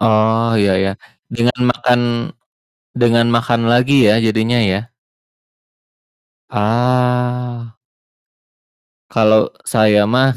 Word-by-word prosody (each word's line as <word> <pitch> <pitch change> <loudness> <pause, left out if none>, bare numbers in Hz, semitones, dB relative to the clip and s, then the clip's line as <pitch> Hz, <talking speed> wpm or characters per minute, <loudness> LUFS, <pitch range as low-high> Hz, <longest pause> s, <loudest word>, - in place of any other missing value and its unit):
Oh, 110 +1 +1
ya 100 -2 +2
ya, 95 0 -1 0.4
dengan 120 +1 -2
makan 125 0 +1 1.0
dengan 115 -1 +2
makan 115 0 0
lagi 125 0 +3
ya, 105 - +4
jadinya 110 +2 0
ya. 100 +5 -3 1.6
Ah. 125 +1 -2 1.3
Kalo 110 -1 +2 0.2
saya 105 -2 +2
mah, 130 +4 +2
115 Hz, 85 wpm, -16 LUFS, 110-125 Hz, 1.6 s, ya